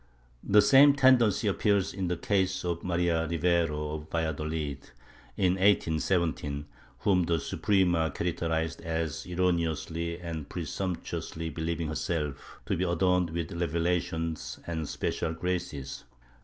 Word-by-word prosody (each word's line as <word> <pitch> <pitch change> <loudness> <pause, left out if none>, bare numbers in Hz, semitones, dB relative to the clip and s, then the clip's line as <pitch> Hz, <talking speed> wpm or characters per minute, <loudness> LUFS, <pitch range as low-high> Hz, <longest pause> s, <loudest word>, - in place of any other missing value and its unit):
^ - - -30 0.5
The 105 0 +8
same 140 +6 +7
tendency 125 -7 +4
appears 100 -1 +1
in 95 -2 -2
the 90 0 -1
case 95 0 0
of 85 -1 -2
Maria 85 -2 +1
Rivero, 80 -3 +1
of 75 0 -7
Valladolid, 75 -3 -3 0.5
in 90 -2 +3
1817, 80 -5 +1 0.4
whom 90 -3 +3
the 85 - +1
vSuprema 85 -1 +1
characterized 80 0 -2
as 80 -2 -3
erroneously 85 -1 -1
and 80 -4 -6
presumptuously 85 -1 -4
believing 80 -1 -2
herself 75 -3 -3
to - - 0
be 90 - -1
adorned 90 0 +2
with 85 0 -3
revelations 85 0 -1
and 80 -3 -3
special 80 - -2
graces. 85 -5 -4
85 Hz, 120 wpm, -29 LUFS, 80-90 Hz, 0.5 s, The